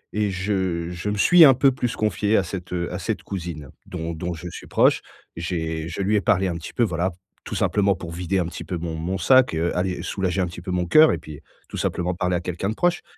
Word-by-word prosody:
et 105 -1 +1
je 90 -3 -2
je 90 +4 -4
me 105 - -2
suis 175 - +7
un 135 - +8
peu 135 +1 +4
plus 125 -2 -2
confié 105 0 +1
à 95 - +2
cette, 90 0 -7
heu, 85 -1 -2
à - - -3
cette - - -3
cousine 85 -7 -6 0.2
dont 80 +1 -4
dont 85 +2 -4
je 85 +2 -8
suis - - -10
proche. - - +3 0.3
J'ai 80 -2 -3
je 85 +4 -4
lui 105 +3 +1
ai 100 - +3
parlé 95 +2 +2
un 85 - -2
petit 85 - -7
peu 120 - +2
voilà, 90 -3 0 0.3
tout - - -6
simplement 100 -2 +2
pour 85 -1 -8
vider 90 +3 -2
un 90 - 0
petit 85 - -6
peu 90 - -4
mon 80 -1 -4
mon 90 +4 -3
sac, 130 -9 +4
heu, 85 +2 -1
aller 90 0 -1
soulager 95 -1 -2
un - - +2
petit 85 0 -9
peu 90 - -8
mon 90 -1 0
cœur 155 - +7
et - - 0
puis 75 -2 -10 0.3
tout - - -6
simplement 90 +1 -1
parler 90 0 -1
à 90 - -1
quelqu'un 90 +2 -3
de 110 - -3
proche 175 +5 +1
90 Hz, 255 wpm, -23 LUFS, 85-100 Hz, 0.3 s, un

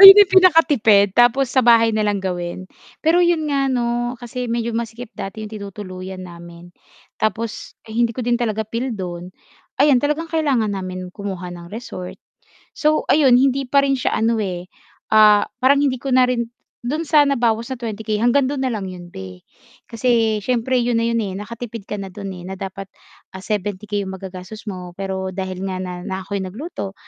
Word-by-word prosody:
ayun 390 0 +13
ang - - -17
pinakatipid, 290 - +5
tapos 245 +3 +3
sa 265 - +4
bahay 230 -2 +5
na 215 - 0
lang 205 -1 +1
gawin. 180 -1 -4 0.4
Pero 330 +3 +4
'yun 345 -3 +3
nga 275 -2 +1
'no 240 0 -1
kasi 245 +1 -5
medyo 235 0 -1
masikip 230 +1 -5
dati 200 +3 -6
yung 215 - -9
tinutuluyan 190 -2 -7
namin 170 0 -12 0.5
tapos 220 +1 -2
hindi 230 +1 +1
ko 250 - -3
din 240 0 +2
talaga 220 -2 -1
feel 235 +4 -3
dun 180 -3 -6 0.5
ayan 280 -3 +5
talagang 300 +3 0
kailangan 270 -10 +1
namin 185 -1 -5
kumuha 190 -3 -5
ng 170 0 -10
resort. 205 -5 -7 0.6
So 305 0 +2
ayon 275 -4 +5
hindi 270 +1 +2
pa 280 +2 +4
rin 275 -1 +2
siya - - 0
ano, 225 +1 +1
eh, 180 -3 -4 0.4
ah, 215 -1 +7 0.2
parang 275 +2 +4
hindi 260 -2 +1
ko 270 0 -2
na 255 - +6
rin 235 -2 0 0.4
dun 300 +6 -1
sa 300 -2 +4
nabawas 235 -4 +1
na 255 - -10
20K 220 -1 -4
hanggang 260 +3 +4
dun 280 -1 -2
na 260 - +1
lang 210 -4 -3
'yon 180 -1 -9
be. 95 - -9 0.5
Kasi 230 -2 +2
siyempre 250 +3 0
yun 240 0 +1
na - - +1
yun, 230 - 0
eh, 195 -3 -3
nakatipid 230 +2 -7
ka 210 - -3
na 195 - -5
dun 200 -1 -6 0.2
na 190 - -5
dapat, 195 0 -6 0.5
ah, 190 - -7
70K 205 0 -2
magagastos 190 +2 -8
mo 180 -2 -7
pero 190 0 -3
dahil 185 -1 -4
nga 190 -1 -3
na 180 -1 -6
na 190 0 -3
ako'y 200 0 -3
nagluto 200 - -6
220 Hz, 180 wpm, -20 LUFS, 190-255 Hz, 0.6 s, ayun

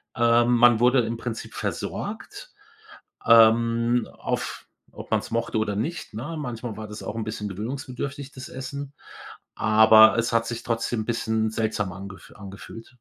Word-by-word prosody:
Ähm, 120 +1 +3
man 120 -1 +6
wurde 125 +1 +4
im 115 +1 -3
Prinzip 115 -1 -6
versorgt, - - -5 0.7
ähm, 115 +1 +4
auf - - -4 0.2
ob - - -11
man's - - -1
mochte 115 -1 -1
oder 105 -2 -1
nicht, 155 +5 -4
ne? 140 +10 -5
Manchmal 120 -4 -5
war 110 -1 -7
das 105 - -8
auch 105 - -5
'n 115 - -3
bisschen 105 -1 -4
gewöhnungsbedürftig, 130 +6 -6
das 130 -1 -9
Essen, 140 +2 -7 0.6
aber 110 +1 +6
es 115 0 -1
hat 115 0 +2
sich 115 -1 -5
trotzdem 115 -1 -2
'n - - -6
bisschen 110 -2 -1
seltsam 110 -4 -2
angef 95 0 -11
angefühlt. 100 +3 -11
115 Hz, 150 wpm, -24 LUFS, 110-125 Hz, 0.7 s, man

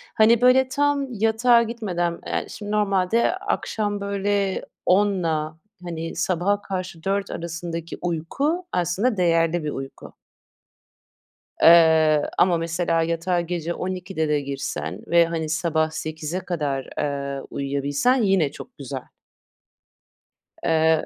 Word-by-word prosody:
Hani, 225 +2 +5
böyle 255 +1 +5
tam 285 -1 0
yatağa 225 +2 +4
gitmeden, 185 -7 -2
eee, - - -2
şimdi 205 -1 -7
normalde 210 - +2
akşam 215 - -2
böyle 200 -1 -1 0.2
10'la 170 -5 +1 0.3
hani, 165 -1 -5
sabaha 185 +4 0
karşı 185 -4 -5
4 195 +1 -1
arasındaki 165 0 -5
uyku 260 - -1
aslında 185 +7 0
değerli 165 -1 +2
bir 150 - -2
uyku. 135 0 -8 1.5
Eee, 160 -2 +6 0.2
ama 175 -2 +4
mesela 165 0 0
yatağa 170 +2 0
gece 170 0 -3
12'de 185 -3 -3
de 150 -1 +1
girsen 105 - -4
ve 170 0 +5
hani, 165 -2 -3
sabah 160 -1 0
8'e 155 +2 -4
kadar, 150 -7 -3
ııı, 140 -1 -3
uyuyabilsen 140 - 0
yine 190 -8 +2
çok 240 - -12
güzel. 135 -2 -6 1.6
Eee 160 -1 +2
175 Hz, 115 wpm, -23 LUFS, 160-205 Hz, 1.6 s, Eee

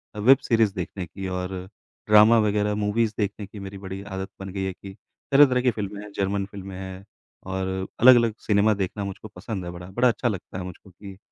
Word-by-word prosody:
a - - -6
web 130 +6 +7
series 110 -4 +3
देखने 90 0 -4
की 95 +3 -7
और 90 0 -3 0.6
ड्रामा 105 +2 +7
वग़ैरह, 105 0 +1
मूवीज़ 105 +2 0
देखने 105 0 -2
की 105 +1 -11
मेरी 100 0 -7
बड़ी 95 0 -7
आदत 95 -1 -5
बन 95 0 -6
गई 95 - -3
है 95 -1 -2
कि 95 +1 -11 0.4
तरह-तरह 135 -3 +6
की 125 -1 +3
फ़िल्में 105 -1 -5
हैं 105 - -11
जर्मन 100 0 -1
फ़िल्में 100 -1 -9
हैं 95 0 -8 0.4
और 95 0 -3 0.3
अलग-अलग 120 -2 +7
सिनेमा 105 +1 +4
देखना 100 +1 -3
मुझको 100 +2 -7
पसंद 95 0 -5
है 85 - -5
बड़ा, 90 0 -9
बड़ा 120 +6 +3
अच्छा 120 +2 -1
लगता 95 -4 -4
है - - -4
मुझको 90 +2 -10
कि 95 +1 -11
100 Hz, 205 wpm, -25 LUFS, 95-105 Hz, 0.6 s, web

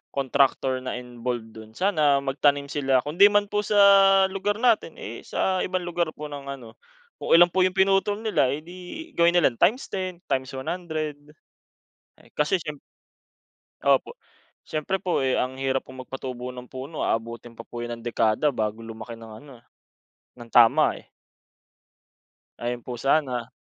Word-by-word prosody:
contractor 135 -1 +1
na 130 - -4
involve 120 -1 -5
do'n, 110 0 -12
sana 155 - +2
magtanim 140 +1 +1
sila. 135 -3 +1
Kundi 170 +8 +5
man 205 0 +2
po 210 - +1
sa 215 - 0 0.6
lugar 205 +2 -2
natin, 225 -9 +2
eh 115 +2 -8
sa 190 -1 0
ibang 185 -1 -2
lugar 175 -1 -1
po 150 - -7
ng 140 -1 -8
ano 130 -5 -8 0.5
kung - - 0
ilan 175 +1 +7
po 185 +1 +3
yung 185 - -5
pinutol 195 +2 +2
nila, 215 -11 +2
edi 180 - -8
gawin 170 0 +4
nila 170 -6 +4
times 245 +7 +2
10, 185 -2 -4
times 130 -1 -1
100. 155 +1 -4 1.0
Eh - - -21
kasi 150 +5 +1
siyemp 150 -2 -6 1.0
Opo. - - +1 0.5
Siyempre 155 +5 -2
po 180 -7 0
eh, 130 - +1
ang 130 +1 -1
hirap 135 0 -1
pong 130 0 -9
magpatubo 125 -1 -6
ng 125 0 -10
puno, 135 +4 -7
aabutin 115 +1 -3
pa 115 - -8
po 120 - -9
yan 120 0 -5
ng - - -17
dekada 115 +4 +1
bago 110 -1 -3
lumaki 115 +1 -8
ng 115 -1 -12
ano, 130 -5 -15 0.8
ng 120 -1 -12
tama 125 +6 +5
eh. - - -29 1.5
Ayun 120 0 -4
po 120 -1 -7
sana. 130 -4 0
140 Hz, 155 wpm, -25 LUFS, 125-175 Hz, 1.5 s, ilan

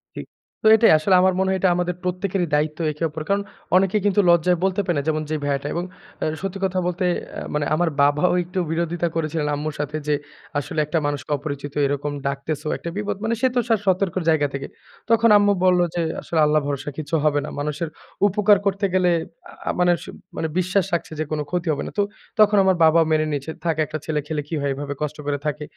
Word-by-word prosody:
ঠিক। - - -6 0.4
তো - - +4
এটাই 225 +1 +5
আসলে 185 +5 +3
আমার 185 0 +4
মনে 190 0 +2
হয় 190 - +1
এটা 185 - +3
আমাদের 180 0 -1
প্রত্যেকেরই 180 0 -1
দায়িত্ব 155 +2 0
একে-অপর। 155 0 -3
কারণ 200 0 +2 0.3
অনেকে 190 +2 +3
কিন্তু 205 0 +3
লজ্জায় 170 +1 +4
বলতে 190 +1 +1
পারে 175 -4 0
না 145 - +1
যেমন 155 -1 +1
যে 155 - -1
ভাইয়াটা। 140 0 -1
এবং 170 +1 -2 0.4
অ্যা - - -1
সত্যি 195 0 -4
কথা 185 0 0
বলতে 180 +1 -1
অ্যা - - -9
মানে 150 -1 0
আমার 170 +1 +1
বাবাও 145 +5 +3
একটু 180 +2 -4
বিরোধিতা 170 +1 -1
করেছিলেন 155 -1 -1
আম্মুর 150 +1 -4
সাথে 150 +1 -2
যে 150 - +3 0.4
আসলে 155 +2 -4
"একটা 160 +3 -1
মানুষকে 145 +1 -4
অপরিচিত 145 -1 -6
এরকম 145 +1 -2 0.2
ডাকতেছো, 140 +2 -3
একটা 170 - -6
বিপদ।" 205 -1 -2
মানে 225 +1 0
সে 260 - +5
তো - - +4
সা 225 - +5
সতর্কর 185 -1 +1
জায়গা 150 -2 +3
থেকে। 140 0 -4 0.4
তখন 230 0 +5
আম্মু 205 0 +4
বলল 180 -1 +4 0.2
যে, 170 - +1 0.2
আসলে 165 - -2
"আল্লাহ 150 0 +3
ভরসা 145 0 -3
কিছু 155 +1 -3
হবে 145 -1 +3
না। - - -6
মানুষের 150 +2 -3 0.4
উপকার 205 +1 +4
করতে 200 0 +1
গেলে" 185 -1 +3 0.4
আ - - -15
আ - - +2
মানে 180 0 +4
স - - -10 0.3
মানে 160 - -1
বিশ্বাস 185 +1 +1
রাখছে 170 - -1
যে - - +1
কোন 155 - -1
ক্ষতি 175 -1 -2
হবে 145 - -3
না। - - -6
তো - - +5 0.4
তখন 210 -1 +6
আমার 190 -1 +3
বাবাও 160 +1 +5
মেনে 155 0 +3
নিয়েছে 145 +2 -3
"থাক 165 - +1
একটা 155 - -5
ছেলে 155 -2 -1
খেলে 150 -2 -2
কি 160 - -3
হয়? 140 -1 0
এভাবে 145 +1 -4
কষ্ট 150 0 -3
করে 145 0 0
থাকে।" 150 0 -2
165 Hz, 220 wpm, -22 LUFS, 150-185 Hz, 0.4 s, তখন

